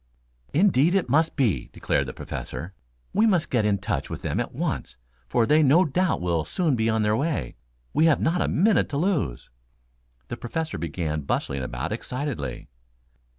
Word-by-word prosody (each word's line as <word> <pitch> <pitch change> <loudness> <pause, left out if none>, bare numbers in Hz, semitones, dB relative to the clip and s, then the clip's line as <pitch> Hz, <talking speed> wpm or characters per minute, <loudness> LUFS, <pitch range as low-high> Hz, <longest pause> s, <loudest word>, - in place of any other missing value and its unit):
"Indeed, 170 -1 +4
it 190 -10 +1
must 160 +3 +3
be," 120 - +1
declared 70 - 0
the 65 - -5
Professor. 90 +5 -6 0.4
"We 215 +3 +4
must 180 -6 +1
get 115 -4 +2
in 100 -1 +2
touch 100 - -3
with - - -6
them - - -1
at - - -2
once, - - -3 0.3
for 115 - +2
they 150 +5 +4
no 155 +6 +5
doubt 175 - 0
will 85 -3 0
soon 160 - 0
be 110 -1 +1
on 110 -1 +1
their 105 0 +2
way. 140 - -2 0.4
We 155 - +4
have 160 -3 +4
not 170 +2 +1
a - - +1
minute 205 +5 +3
to 140 - -2
lose." 150 - -1 0.8
The - - -5
Professor 160 - -4
began 80 -1 -2
bustling 70 -1 -2
about 65 - -4
excitedly. 125 - -4
135 Hz, 175 wpm, -25 LUFS, -, 0.8 s, no